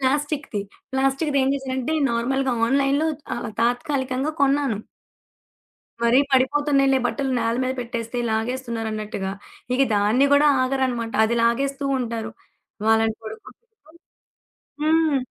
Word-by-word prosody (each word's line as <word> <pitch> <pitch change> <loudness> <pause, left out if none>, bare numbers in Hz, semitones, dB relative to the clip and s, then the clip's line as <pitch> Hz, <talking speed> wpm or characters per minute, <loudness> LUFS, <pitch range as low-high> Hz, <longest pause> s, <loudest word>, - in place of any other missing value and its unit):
ప్లాస్టిక్కుది. 280 -4 -1 0.3
ప్లాస్టిక్కుది 270 +2 +1
ఏం 265 - +2
చేశానంటే, 265 +2 -2 0.2
నార్మల్‌గా 260 +3 0
ఆన్‌లైన్‌లో 275 +4 +2 0.3
ఆహ్, 240 -2 -5
తాత్కాలికంగా 260 +3 -1
కొన్నాను. 275 -6 +2 1.2
మరి 235 +2 +5
పడిపోతున్నాయిలే 275 0 +3
బట్టలు 270 +1 -2
నేల 230 0 0
మీద 255 - 0
పెట్టేస్తే 235 0 -4
లాగేస్తున్నారన్నట్టుగా. 220 -4 -3 0.4
ఇగ 270 - +3
దాన్ని 215 +7 +3
కూడా 285 +1 +5 0.2
ఆగరన్నమాట. 255 -3 -1
అది 235 +2 0
లాగేస్తూ 275 +4 0
ఉంటారు. 225 -2 -3 0.6
వాళ్లని 225 0 +3
పడుకోబెట్టి 220 0 -10 1.3
హ్మ్. 315 -2 +3
260 Hz, 100 wpm, -23 LUFS, 230-275 Hz, 1.3 s, మరి